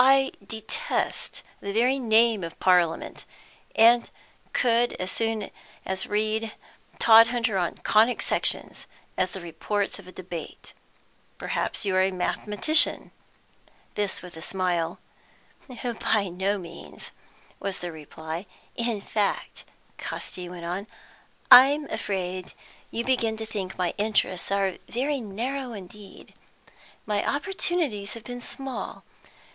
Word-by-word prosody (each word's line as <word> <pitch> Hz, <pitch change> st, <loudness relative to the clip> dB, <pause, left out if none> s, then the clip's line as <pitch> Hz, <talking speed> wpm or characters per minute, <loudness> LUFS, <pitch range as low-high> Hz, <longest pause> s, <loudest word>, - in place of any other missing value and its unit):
"I 270 Hz, +1 st, +5 dB
detest 220 Hz, -, -3 dB, 0.2 s
the 200 Hz, -, -4 dB
very 250 Hz, +5 st, +3 dB
name 225 Hz, -3 st, +4 dB
of 165 Hz, -1 st, -7 dB
Parliament, 180 Hz, -3 st, +2 dB, 0.5 s
and 235 Hz, +1 st, +6 dB, 0.4 s
could 240 Hz, -1 st, +3 dB
as 185 Hz, 0 st, -1 dB
soon 225 Hz, -2 st, -1 dB, 0.6 s
read 215 Hz, +1 st, 0 dB, 0.4 s
Todhunter 230 Hz, -2 st, +6 dB
on 175 Hz, -, -1 dB
Conic 225 Hz, +3 st, +4 dB
Sections -, -, 0 dB, 0.3 s
as 185 Hz, -, +1 dB
the 190 Hz, -, -7 dB
reports 195 Hz, +5 st, -2 dB
of 190 Hz, -, -13 dB
a -, -, -9 dB
debate. 180 Hz, -3 st, -8 dB, 0.6 s
Perhaps -, -, -2 dB
you're 185 Hz, -1 st, +3 dB
a 190 Hz, -, +3 dB
mathematician?" 210 Hz, -, +2 dB, 0.8 s
This 205 Hz, -2 st, -2 dB
with 180 Hz, -2 st, -10 dB
a 160 Hz, -, -9 dB
smile. 175 Hz, -2 st, -1 dB, 0.7 s
"By 230 Hz, -5 st, -1 dB
no 190 Hz, +3 st, 0 dB
means," 170 Hz, -2 st, -8 dB, 0.5 s
was 195 Hz, -2 st, -3 dB
the 175 Hz, -1 st, -5 dB
reply. 160 Hz, +3 st, -7 dB, 0.3 s
"In 235 Hz, -3 st, -1 dB
fact," 205 Hz, 0 st, -2 dB, 0.3 s
Casti 180 Hz, -1 st, -5 dB
went 175 Hz, -1 st, -8 dB
on, 185 Hz, +5 st, -3 dB, 0.6 s
"I'm 280 Hz, +4 st, +9 dB
afraid 185 Hz, -2 st, -3 dB, 0.4 s
you 230 Hz, -, -2 dB
begin 230 Hz, -4 st, +1 dB
to 220 Hz, -, -4 dB
think 200 Hz, -4 st, -5 dB
my 180 Hz, -1 st, 0 dB
interests 205 Hz, -4 st, 0 dB
are 195 Hz, -2 st, +1 dB
very 275 Hz, +4 st, 0 dB
narrow 245 Hz, +5 st, -3 dB
indeed. 200 Hz, 0 st, -11 dB, 0.7 s
My 210 Hz, -1 st, 0 dB
opportunities 290 Hz, -, -1 dB
have 230 Hz, -, -9 dB
been 245 Hz, 0 st, -7 dB
small. 270 Hz, +1 st, -5 dB
210 Hz, 120 wpm, -26 LUFS, 185-235 Hz, 0.8 s, I'm